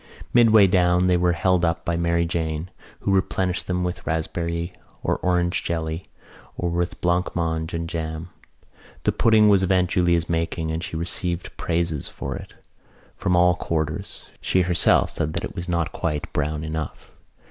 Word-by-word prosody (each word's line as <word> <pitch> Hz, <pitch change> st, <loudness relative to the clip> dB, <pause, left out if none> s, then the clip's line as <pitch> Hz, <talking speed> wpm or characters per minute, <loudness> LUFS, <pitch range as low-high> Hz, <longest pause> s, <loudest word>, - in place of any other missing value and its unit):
Midway 110 Hz, -4 st, +7 dB
down 90 Hz, -1 st, +3 dB
they 90 Hz, -1 st, +4 dB
were 90 Hz, 0 st, +2 dB
held 90 Hz, 0 st, +2 dB
up 85 Hz, -1 st, 0 dB
by 85 Hz, -, 0 dB
Mary 85 Hz, 0 st, +1 dB
Jane, 80 Hz, 0 st, -3 dB, 0.3 s
who -, -, 0 dB
replenished 95 Hz, -1 st, 0 dB
them 90 Hz, -1 st, 0 dB
with 90 Hz, 0 st, -3 dB
raspberry 85 Hz, +1 st, -2 dB, 0.3 s
or -, -, +1 dB
orange 90 Hz, -1 st, 0 dB
jelly 80 Hz, +1 st, -3 dB, 0.5 s
or 90 Hz, -, -1 dB
with 85 Hz, +1 st, -2 dB
blancmange 85 Hz, -2 st, 0 dB
and 85 Hz, 0 st, -3 dB
jam. 80 Hz, 0 st, -4 dB, 0.7 s
The -, -, +3 dB
pudding 110 Hz, -2 st, +4 dB
was 100 Hz, -2 st, +5 dB
of 95 Hz, 0 st, +1 dB
Aunt 90 Hz, -1 st, +2 dB
Julia's 85 Hz, -2 st, +2 dB
making 80 Hz, -1 st, -1 dB
and 80 Hz, +2 st, -3 dB
she 80 Hz, -, -4 dB
received 85 Hz, +1 st, -3 dB
praises 85 Hz, -4 st, -1 dB
for 70 Hz, 0 st, -5 dB
it -, -, -9 dB, 0.6 s
from 90 Hz, -, 0 dB
all 90 Hz, 0 st, +5 dB
quarters. 80 Hz, +1 st, -3 dB, 0.2 s
She 95 Hz, -, +2 dB
herself 90 Hz, -1 st, +4 dB
said 80 Hz, -1 st, -2 dB
that -, -, -2 dB
it -, -, -5 dB
was 90 Hz, +1 st, -5 dB
not 85 Hz, 0 st, 0 dB
quite 75 Hz, -4 st, -3 dB
brown 75 Hz, +1 st, -1 dB
enough. 80 Hz, 0 st, -5 dB
85 Hz, 165 wpm, -23 LUFS, 80-90 Hz, 0.7 s, Midway